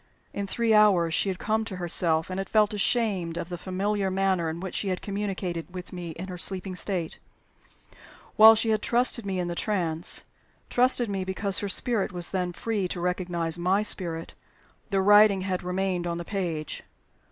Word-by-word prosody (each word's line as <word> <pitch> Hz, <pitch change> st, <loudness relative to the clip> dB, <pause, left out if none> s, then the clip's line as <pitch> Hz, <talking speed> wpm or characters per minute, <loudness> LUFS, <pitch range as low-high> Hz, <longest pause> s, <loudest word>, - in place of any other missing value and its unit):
In 200 Hz, 0 st, -3 dB
three 230 Hz, +2 st, +1 dB
hours 195 Hz, -6 st, +4 dB
she 195 Hz, -, +1 dB
had 185 Hz, -, -3 dB
come 220 Hz, +3 st, 0 dB
to 200 Hz, -, -6 dB
herself, 170 Hz, -1 st, 0 dB
and 185 Hz, -, -3 dB
had 195 Hz, -, -4 dB
felt 215 Hz, -1 st, +3 dB
ashamed 200 Hz, -6 st, 0 dB
of 170 Hz, -, -5 dB
the 180 Hz, -, -4 dB
familiar 195 Hz, +2 st, -1 dB
manner 190 Hz, -3 st, 0 dB
in 160 Hz, +1 st, -5 dB
which 185 Hz, 0 st, -6 dB
she 205 Hz, -, -1 dB
had 185 Hz, -1 st, -1 dB
communicated 195 Hz, -4 st, -4 dB
with 180 Hz, 0 st, -8 dB
me 175 Hz, -2 st, -6 dB
in 185 Hz, +3 st, -7 dB
her 180 Hz, -2 st, -7 dB
sleeping 190 Hz, 0 st, -2 dB
state. 180 Hz, -2 st, -3 dB, 1.2 s
While 220 Hz, +1 st, +9 dB
she 225 Hz, 0 st, +1 dB
had 215 Hz, -1 st, +1 dB
trusted 235 Hz, -2 st, +2 dB
me 190 Hz, -1 st, -2 dB
in 180 Hz, -1 st, -1 dB
the 175 Hz, -, -3 dB
trance 170 Hz, -4 st, -1 dB, 0.5 s
trusted 245 Hz, -1 st, +3 dB
me 195 Hz, -2 st, -2 dB
because 190 Hz, +1 st, +1 dB
her 205 Hz, -, -3 dB
spirit 220 Hz, +1 st, 0 dB
was 175 Hz, -1 st, -2 dB
then 180 Hz, -2 st, -1 dB
free 205 Hz, +1 st, -2 dB
to 180 Hz, -, -5 dB
recognize 175 Hz, -2 st, -2 dB
my 190 Hz, +4 st, +2 dB
spirit 170 Hz, -5 st, -3 dB, 0.6 s
the 195 Hz, -2 st, +1 dB
writing 205 Hz, -1 st, +6 dB
had 185 Hz, -1 st, -2 dB
remained 180 Hz, -1 st, -2 dB
on 170 Hz, 0 st, -2 dB
the 170 Hz, -, -6 dB
page. 170 Hz, -7 st, -4 dB
190 Hz, 185 wpm, -26 LUFS, 175-205 Hz, 1.2 s, While